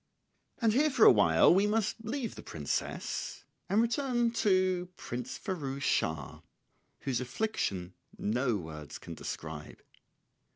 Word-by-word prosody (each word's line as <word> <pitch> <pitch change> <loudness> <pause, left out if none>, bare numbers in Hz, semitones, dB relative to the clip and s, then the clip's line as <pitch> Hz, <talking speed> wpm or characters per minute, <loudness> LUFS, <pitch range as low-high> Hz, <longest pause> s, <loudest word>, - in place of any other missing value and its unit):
] - - -46
And 225 -2 +4
here 295 +5 +4
for 255 -6 +5
a - - +11
while 90 - +6
we 195 +3 +4
must 220 +1 0
leave 230 0 -3
the - - -9
princess 75 -4 -3 0.2
and 210 +4 +4
return 240 -1 +1
to 185 -5 +2
Prince 125 +1 -5
Firouz 140 -8 -4
Schah, 80 - 0 0.6
whose 130 -3 -1
affliction 120 - -2 0.2
no 120 +1 0
words 80 -4 -8
can - - -9
describe. 75 -2 -7
175 Hz, 130 wpm, -31 LUFS, -, 0.6 s, a